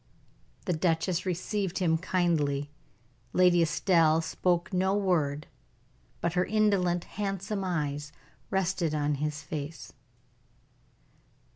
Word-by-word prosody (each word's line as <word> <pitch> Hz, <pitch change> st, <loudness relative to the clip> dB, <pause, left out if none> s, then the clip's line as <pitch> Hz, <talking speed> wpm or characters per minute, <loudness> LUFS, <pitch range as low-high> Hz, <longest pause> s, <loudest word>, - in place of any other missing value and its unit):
The 180 Hz, -, +1 dB
duchess 170 Hz, +2 st, 0 dB
received 185 Hz, +1 st, -2 dB
him 170 Hz, -3 st, +2 dB
kindly. 155 Hz, -6 st, 0 dB, 0.6 s
Lady 180 Hz, -1 st, +5 dB
Estelle 165 Hz, 0 st, +3 dB
spoke 175 Hz, +3 st, 0 dB
no 190 Hz, +2 st, +2 dB
word, 155 Hz, -7 st, +1 dB, 0.8 s
but 170 Hz, -, 0 dB
her 180 Hz, 0 st, +2 dB
indolent, 190 Hz, -5 st, +2 dB
handsome 195 Hz, 0 st, -3 dB
eyes, 145 Hz, -5 st, -2 dB, 0.4 s
rested 180 Hz, -4 st, 0 dB
on 150 Hz, 0 st, +1 dB
his 150 Hz, 0 st, -2 dB
face. 150 Hz, 0 st, -6 dB
175 Hz, 100 wpm, -29 LUFS, 155-190 Hz, 0.8 s, Lady